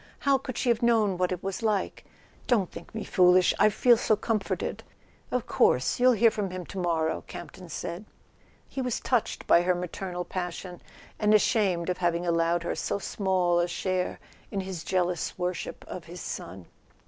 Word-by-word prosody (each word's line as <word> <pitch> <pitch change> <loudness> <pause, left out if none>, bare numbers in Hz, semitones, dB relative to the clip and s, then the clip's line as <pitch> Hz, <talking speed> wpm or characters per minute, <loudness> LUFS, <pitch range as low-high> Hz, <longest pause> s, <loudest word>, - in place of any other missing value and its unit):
How 275 -1 +2
could 255 -2 -6
she 245 - 0
have 235 0 +2
known 225 -5 +3
what 180 0 +1
it 180 -1 -4
was 195 +2 -3
like? 215 -3 -1 0.4
Don't 210 -8 +2
think - - -11
me 220 - -3
foolish—I 180 +2 +4
feel 240 +3 +4
so 220 - +2
comforted!" 215 -1 -2 0.5
"Of 250 -2 -1
course; 125 - +2
you'll 250 0 +6
hear 230 0 +5
from 205 -3 -2
him 180 -1 -6
to 195 - -7
morrow," 165 -3 0
Camp¬ - - -8
ton 180 -2 -12
said. 170 +5 -5 0.6
He 270 - -4
was 250 -3 -1
touched 245 -4 -1
by 170 - +6
her 180 +1 +2
maternal 180 0 -4
passion, 180 -1 -5 0.4
and 215 0 +4
ashamed 195 -5 +2
of 180 - -1
having 175 0 0
allowed 170 0 +1
her - - -1
so - - -2
small 185 -3 +1
a 175 - +2
share 185 +1 -2 0.3
in 195 - -2
his 185 -3 -6
jealous 180 -2 -1
worship 180 -1 -4
of 180 - -7
his 175 +2 -9
son. 90 - -6
185 Hz, 180 wpm, -27 LUFS, 175-215 Hz, 0.6 s, you'll